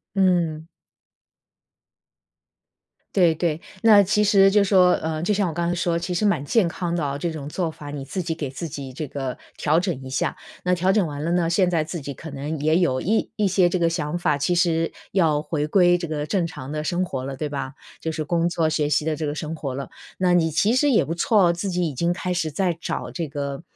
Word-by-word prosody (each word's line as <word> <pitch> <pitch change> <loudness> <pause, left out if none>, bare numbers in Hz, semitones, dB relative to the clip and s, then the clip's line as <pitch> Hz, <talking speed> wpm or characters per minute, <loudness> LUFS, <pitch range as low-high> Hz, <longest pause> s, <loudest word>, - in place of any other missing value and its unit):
嗯。 170 -5 +1 2.5
对 175 -4 +4
对。 165 -1 -1 0.2
那 215 -3 +7
其 210 +2 +2
实 195 -2 +5
就 205 +1 +4
说 185 -2 +5
呃， 160 0 -3
就 195 - +1
像 200 -3 +1
我 160 - -5
刚 170 0 -1
才 175 - 0
说， 170 -1 0
其 175 +1 -4
实 195 +5 0
蛮 200 -9 +1
健 185 +3 +2
康 175 -1 -3
的 170 - -1
啊， 140 0 -2
这 170 +3 -2
种 150 -2 -6
做 170 +1 -2
法 145 -2 -9
你 145 -2 -5
自 180 +7 -4
己 165 -1 -2
给 145 -4 -4
自 160 +5 -6
己 135 -2 -7
这 150 +3 -5
个 135 -2 -4 0.2
调 155 +3 +2
整 175 -8 -3
一 130 - -8
下。 130 - -1 0.3
那 180 0 +2
调 185 +2 +2
整 200 -4 +2
完 145 0 -5
了 170 - 0
呢， 175 -2 +2
现 180 +1 +2
在 165 -3 +1
自 165 +1 -5
己 140 0 -6
可 160 +4 -9
能 145 +3 -4
也 155 +2 +2
有 130 -8 +1
一 220 +5 0
一 210 -2 +2
些 185 -1 +3
这 185 - -1
个 170 - +3
想 165 0 -2
法， 155 -4 +1
其 145 +5 0
实 165 -2 +1 0.2
要 160 -6 +2
回 150 0 -2
归 175 +1 +4
这 175 -1 -4
个 150 -1 -3
正 175 +2 0
常 135 -5 -8
的 150 0 -3
生 180 +2 0
活 130 -6 -4
了， 135 0 -5
对 150 +1 -3
吧？ 140 -1 -4 0.3
就 160 - -3
是 155 -1 -3
工 170 +2 +1
作、 165 -2 0
学 155 -2 0
习 150 +1 +1
的 155 -1 -1
这 155 - -3
个 145 - -2
生 155 +1 -4
活 140 -4 -4
了。 135 -1 -5 0.3
那 180 -1 +3
你 165 -2 +3
其 200 +9 +2
实 290 +3 +3
也 235 - +4
不 165 - -3
错 200 +2 +3
哦， - - +3
自 185 +3 -3
己 180 -2 0
已 145 - -6
经 170 +7 +1
开 180 0 -3
始 165 -3 -1
在 175 +2 0
找 - - -4
这 170 -3 -3
个， 140 0 -4
165 Hz, 265 characters per minute, -23 LUFS, 150-180 Hz, 2.5 s, 那